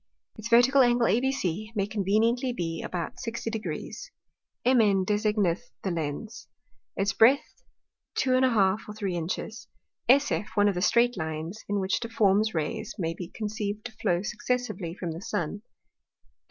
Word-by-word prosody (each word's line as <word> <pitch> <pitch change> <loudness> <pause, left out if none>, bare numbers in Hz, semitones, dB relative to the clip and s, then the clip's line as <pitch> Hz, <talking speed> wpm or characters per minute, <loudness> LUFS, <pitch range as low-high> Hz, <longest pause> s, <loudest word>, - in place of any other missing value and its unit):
Its 220 0 -6
vertical 245 +4 +6
Angle 240 -1 +4
ABC 225 -4 0
may 200 -2 +1
conveniently 220 +5 +1
be 165 -7 -3
about 175 -2 -4
60 230 -1 -4
Degrees: 225 - -5 0.6
MN 215 -7 +4
designeth 210 0 0
the 190 - -1
Lens. 170 +8 -4 0.5
Its 195 +1 +1
breadth 250 +7 +3 0.5
2½ 245 -7 +3
or 210 - -7
3 200 -4 -2
Inches. 185 +7 -4 0.4
SF 265 -5 +4
one 205 -1 +4
of 205 - +2
the 180 - -3
streight 240 +3 +3
Lines, 160 +5 -4
in 205 0 +1
which 190 0 0
difform 210 -4 +2
Rays 155 -5 -3
may 165 -3 -1
be 175 0 -7
conceived 210 0 -4
to 240 - -5
flow 180 -5 -1
successively 215 -6 -2
from 175 -4 -4
the 165 +2 -7
Sun. 205 -3 -3
210 Hz, 140 wpm, -27 LUFS, 185-235 Hz, 0.6 s, vertical